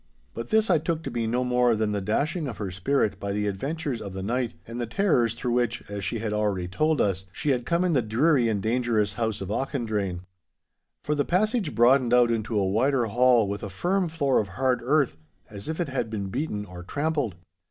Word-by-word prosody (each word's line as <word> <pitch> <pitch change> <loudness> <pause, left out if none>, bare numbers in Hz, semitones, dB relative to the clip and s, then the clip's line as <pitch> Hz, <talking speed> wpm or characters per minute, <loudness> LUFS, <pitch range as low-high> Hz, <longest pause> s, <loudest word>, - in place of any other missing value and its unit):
But 115 - -6
this 220 0 +3
I - - +4
took 165 +1 -2
to - - -4
be 115 -1 -1
no 125 +3 0
more 125 -1 +3
than 110 -1 0
the 100 -1 -1
dashing 145 - -1
of 115 -6 -6
her 100 -3 -4
spirit 100 +1 0
by 100 -1 -3
the 105 0 -1
adventures 135 +6 -3
of 100 -2 -6
the 95 0 -5
night, 120 0 -1
and 115 +1 -6
the 120 - -2
terrors 120 - +2
through 120 - -2
which, 120 -1 0
as 100 -1 -4
she 115 - -1
had 110 -1 -3
already 105 -4 0
told 155 - +1
us, 95 -2 0
she 145 - -1
had 125 -2 -1
come 170 +1 +2
in 175 - +2
the 130 - +3
dreary 120 +3 +2
and 100 -3 -1
dangerous 110 -3 +1
house 110 -1 -2
of 95 - -5
Auchendrayne. 110 -8 -2 0.8
For 150 - 0
the 145 -1 +1
passage 210 - 0
broadened 125 +1 +5
out 120 -1 +5
into 110 -1 -1
a 95 - +1
wider 120 +5 +2
hall 120 0 +4
with 100 +1 -4
a 100 - -5
firm 180 - 0
floor 140 -5 +1
of 105 - -1
hard 130 -1 +1
earth, 135 - +2 0.3
as 100 +5 -7
if 160 - -3
it 170 -4 -1
had 125 -4 -2
been 100 -3 -4
beaten 105 -4 -3
or 90 -3 -10
trampled. 145 - -1
120 Hz, 225 wpm, -26 LUFS, 105-140 Hz, 0.8 s, broadened